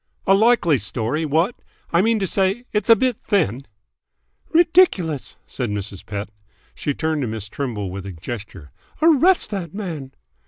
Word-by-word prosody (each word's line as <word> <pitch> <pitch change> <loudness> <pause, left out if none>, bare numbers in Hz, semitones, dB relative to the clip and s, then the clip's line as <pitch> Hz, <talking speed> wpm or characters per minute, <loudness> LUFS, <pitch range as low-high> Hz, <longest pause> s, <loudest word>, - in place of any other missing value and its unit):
"A 195 - +5
likely 195 - +4
story, 115 +9 -1
what! 165 - +1 0.4
I 170 - +5
mean 225 +2 +2
to 200 - -1
say, 195 +5 0
it's 210 0 -1
a 230 - +9
bit 250 +1 0
thin!" 140 - 0 0.8
"Ridiculous!" 325 - +3
said 125 -4 -3
Mrs. 100 -2 -4
Pett. 100 0 -5 0.4
She 145 - -3
turned 160 -2 -1
to 130 - -1
Miss 110 -2 -4
Trimble 105 -6 -4
with 100 +1 -6
a - - -5
gesture. 95 - -8 0.3
"Arrest 330 - +4
that 185 -4 -5
man!" 160 -10 -5
160 Hz, 155 wpm, -21 LUFS, -, 0.8 s, a